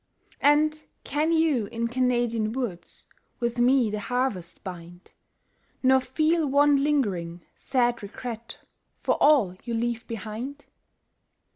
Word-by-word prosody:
And 305 +1 +3 0.2
can 300 +3 0
you 315 -9 +2
in 230 +2 -2
Canadian 240 -3 0
woods 205 -10 -5 0.3
With 235 0 -2
me 245 -2 +4
the 210 - -2
harvest 230 -7 -2
bind, 175 -1 -10 0.7
Nor 260 0 +5
feel 310 +4 +1
one 285 0 +4
lingering, 185 - -1
sad 245 -3 0
regret 230 +3 -7 0.5
For - - +2
all 265 -12 +4
you 235 -1 -3
leave 235 0 -2
behind? 230 +6 -6
240 Hz, 115 wpm, -26 LUFS, 215-280 Hz, 0.7 s, Nor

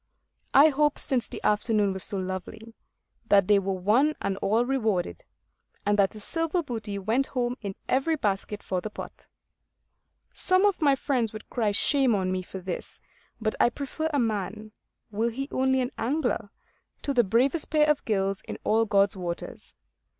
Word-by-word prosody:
I 290 +3 +8
hope, 295 0 +2
since 250 -4 -1
the - - -7
afternoon 210 -1 +2
was 190 - -2
so 200 - 0
lovely, 190 +4 -6 0.5
that 200 -2 +5
they 205 -1 +5
were 195 0 -2
one 250 +11 +3
and 195 - -1
all 220 +5 +1
rewarded; 220 - -1 0.6
and 205 0 +3
that 195 +1 +3
a - - -8
silver 330 - -1
booty 220 -7 -4
went 225 +8 0
home 245 -1 -1
in 200 -3 -5
every 270 +5 +2
basket 205 -4 -2
for 185 -1 -2
the 215 - -5
pot. - - -10 1.1
Some 370 +2 +2
of 400 -4 +1
my 285 -3 +4
friends 245 -5 -1
would 215 - -10
cry 225 -4 +1
shame 260 +3 +3
on 185 -2 0
me 185 0 -1
for 185 - -9
this; 185 -1 -5 0.4
but 215 -1 -1
I - - +5
prefer 285 +5 -4
a 290 - 0
man, 215 -2 -2 0.4
were 220 +3 0
he 270 +4 -4
only 265 0 +2
an 250 +1 -2
angler, 285 +8 -1 0.5
to 280 - -1
the 245 -2 +4
bravest 255 - +1
pair 305 -1 +3
of 300 -1 +2
gills 195 -2 -1
in - - -5
all 225 +1 +3
God's 200 -2 +3
waters. 175 -2 -6
225 Hz, 175 wpm, -27 LUFS, 200-270 Hz, 1.1 s, I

